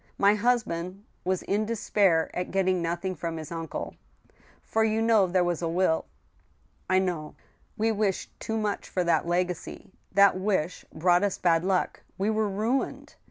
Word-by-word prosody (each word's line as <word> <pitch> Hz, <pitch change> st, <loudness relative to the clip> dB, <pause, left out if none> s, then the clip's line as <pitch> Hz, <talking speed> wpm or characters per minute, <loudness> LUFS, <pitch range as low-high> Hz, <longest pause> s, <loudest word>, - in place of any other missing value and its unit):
My 200 Hz, +1 st, +5 dB
husband 205 Hz, -5 st, -1 dB, 0.2 s
was 185 Hz, 0 st, -1 dB
in 210 Hz, +2 st, 0 dB
despair 200 Hz, -7 st, +2 dB
at 180 Hz, -, -2 dB
getting 185 Hz, -2 st, +1 dB
nothing 170 Hz, +3 st, -2 dB
from 165 Hz, 0 st, -4 dB
his 155 Hz, 0 st, -7 dB
uncle.... 165 Hz, -1 st, -5 dB, 0.7 s
For 220 Hz, -, +1 dB
you 220 Hz, 0 st, +1 dB
know 225 Hz, -4 st, +4 dB
there 180 Hz, 0 st, +2 dB
was 175 Hz, -1 st, -1 dB
a 170 Hz, -, 0 dB
will? 170 Hz, -1 st, +1 dB, 0.3 s
" -, -, -37 dB
" -, -, -38 dB
I 185 Hz, -, +4 dB
know." 175 Hz, -5 st, -1 dB, 0.2 s
" -, -, -38 dB
We 225 Hz, +1 st, +2 dB
wished 205 Hz, -3 st, -1 dB
too 225 Hz, -, -3 dB
much 210 Hz, -2 st, -2 dB
for 180 Hz, -, 0 dB
that 170 Hz, 0 st, +2 dB
legacy; 180 Hz, +1 st, -2 dB, 0.2 s
that 200 Hz, 0 st, +5 dB
wish 185 Hz, -3 st, -1 dB
brought 175 Hz, +2 st, +3 dB
us 200 Hz, -2 st, 0 dB
bad 165 Hz, -2 st, +2 dB
luck..., 185 Hz, -1 st, 0 dB, 0.2 s
We 200 Hz, +3 st, +1 dB
were 215 Hz, -1 st, +1 dB
ruined. 220 Hz, +7 st, -2 dB
185 Hz, 175 wpm, -27 LUFS, 175-210 Hz, 0.7 s, My